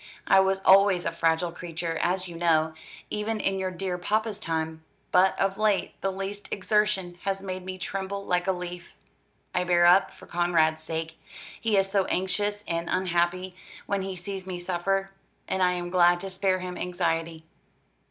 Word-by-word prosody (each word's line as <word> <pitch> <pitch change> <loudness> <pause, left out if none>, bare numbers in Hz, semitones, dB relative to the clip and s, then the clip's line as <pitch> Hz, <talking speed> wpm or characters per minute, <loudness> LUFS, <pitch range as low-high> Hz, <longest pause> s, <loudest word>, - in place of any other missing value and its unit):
I 195 - +6
was 190 0 +2
always 195 -2 +6
a - - 0
fragile 165 +1 +1
creature, 165 -1 -4
as 185 +1 0
you 170 - -9
know, 160 -2 +2 0.4
even 215 +1 -2
in 195 -1 0
your 190 0 -1
dear 185 0 -3
papa's 215 +3 -1
time; 160 -1 -2 0.3
but 185 +1 +4
of 195 +1 0
late 215 -2 +1
the 195 - 0
least 195 +2 -5
exertion 195 -3 0
has 195 0 -2
made 185 -1 -5
me 185 0 -6
tremble 195 +1 -4
like 180 0 0
a - - +4
leaf. 180 -1 -7 0.6
I 180 - +1
bear 175 -1 +4
up, 180 +3 +6
for - - -15
Conrad's 165 -2 +2
sake. 160 0 -5 0.4
He 220 -3 +2
is 195 0 +2
so 195 -2 +2
anxious 205 +2 -1
and 170 0 -2
unhappy 180 0 0 0.3
when 200 -1 -1
he 190 0 -4
sees 190 +1 -6
me 185 -1 -4
suffer, 190 +2 -1 0.4
and 190 - -1
I 180 0 +4
am 175 0 -4
glad 175 -1 +5
to 195 - -5
spare 185 0 +1
him 180 -1 -5
anxiety. 165 -2 -2
185 Hz, 175 wpm, -27 LUFS, 175-195 Hz, 0.6 s, I